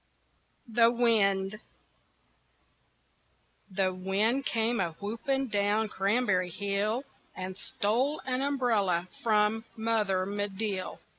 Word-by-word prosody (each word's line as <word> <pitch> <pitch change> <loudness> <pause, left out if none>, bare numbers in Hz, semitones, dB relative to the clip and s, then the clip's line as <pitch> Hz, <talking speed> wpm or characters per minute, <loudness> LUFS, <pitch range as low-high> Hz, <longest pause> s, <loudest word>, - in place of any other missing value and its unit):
THE 230 0 +4
WIND 215 -4 +2 2.1
The 185 -1 0
wind 205 +8 0
came 230 +1 +1
a 170 -4 -1
whooping, 235 - -2
down 205 +1 +1
Cranberry 195 -3 +1
Hill 200 +6 -1 0.3
And 185 0 -5
stole 240 +9 0
an 255 0 -1
umbrella 220 -11 +1
from, 215 0 +2
Mother 215 -5 0
Medill. 205 -1 -3
210 Hz, 90 wpm, -29 LUFS, 195-230 Hz, 2.1 s, THE